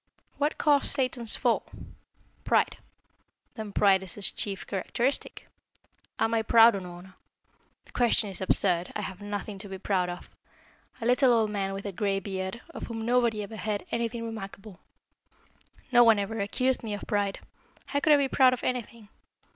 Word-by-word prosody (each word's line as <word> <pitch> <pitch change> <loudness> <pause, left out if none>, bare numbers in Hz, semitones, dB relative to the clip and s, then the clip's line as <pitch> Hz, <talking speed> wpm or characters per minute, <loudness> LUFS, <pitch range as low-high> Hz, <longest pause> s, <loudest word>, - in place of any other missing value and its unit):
"What 295 +1 0
caused 290 -2 +3
Satan's 255 -4 +1
fall? - - +1 0.8
Pride. - - +2 0.8
Then 220 -3 -7
pride 195 -1 +4
is 190 -2 -8
his 205 - 0
chief 195 -2 -4
characteristic. 240 +7 -2 0.7
Am 225 - 0
I 225 - +2
proud, 230 +1 +6
Unorna? 180 -1 -8 0.7
The - - -19
question 240 -3 +2
is 195 -1 -7
absurd, 180 -2 +2
I 210 - -2
have 190 -1 -7
nothing 205 0 -5
to 200 0 -9
be 190 - -6
proud 185 -2 0
of 175 - -9 0.7
a - - -3
little 250 +2 +4
old 225 -3 +2
man 195 -2 -2
with 195 +1 -6
a 200 - -3
gray 195 +1 -1
beard, 190 +3 -5
of - - -7
whom 225 -1 -5
nobody 235 -3 +1
ever 220 +2 -8
heard 210 -1 -3
anything 235 0 -2
remarkable. 200 -3 -8 1.1
No 240 -1 +7
one 225 -2 +6
ever 210 +2 -3
accused 255 +6 +1
me 215 -3 -4
of 205 - -9
pride. 205 -3 -1 0.5
How 285 - -1
could 305 +1 +4
I - - +7
be 280 -1 +1
proud 260 -1 +4
of 250 - -5
anything? 235 -3 -4
215 Hz, 170 wpm, -28 LUFS, 195-235 Hz, 1.1 s, No